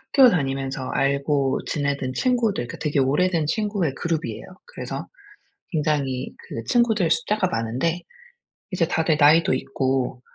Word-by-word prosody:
학교 265 -3 +8
다니면서 135 - -2
알고 140 0 +1
지내던 140 -3 -2
친구들 230 - 0
그 - - -9
되게 150 -2 0
오래된 160 +4 +2
친구의 200 -4 -1
그룹이에요. 165 -2 -3 0.2
그래서 - - -6 0.7
굉장히 145 -5 -1
그 115 - -8
친구들 220 - +2
숫자가 210 -5 +1
많은데 130 +7 -1 0.7
이제 175 -3 +1
다들 160 -2 +1
나이도 155 +3 +5
있고 130 -2 -1
150 Hz, 305 characters per minute, -23 LUFS, 135-180 Hz, 0.7 s, 학교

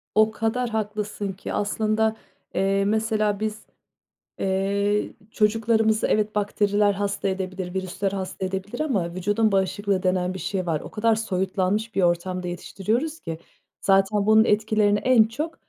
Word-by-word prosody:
O 215 0 +5
kadar 225 +2 -1
haklısın 210 -2 -3
ki. 190 - -7
Aslında, 215 +1 +1 0.4
eee, 195 +1 +2
mesela 215 -1 +1
biz, 215 0 -4 0.7
eee, 200 +2 0 0.2
çocuklarımızı, 220 0 +2
evet, 215 0 +1
bakteriler 205 0 +2
hasta 200 0 -2
edebilir, 185 -1 -3
virüsler 190 +1 -2
hasta 190 -1 -4
edebilir 190 +1 -4
ama 200 - -1
vücudun 205 +4 +1
bağışıklığı 195 0 0
denen 185 0 +1
bir 190 - -6
şey 185 -2 -2
var. 160 -3 -1
O - - -10
kadar 225 +1 +2
soyutlanmış 200 +1 -1
bir 195 - +2
ortamda 180 +1 0
yetiştiriyoruz 220 - -2
ki. 165 -1 -5 0.4
Zaten 195 +1 +3
bunun 220 +1 +6
etkilerini 210 -1 +2
en 255 -4 +5
çok, 300 +9 -4
205 Hz, 140 wpm, -24 LUFS, 190-220 Hz, 0.7 s, bunun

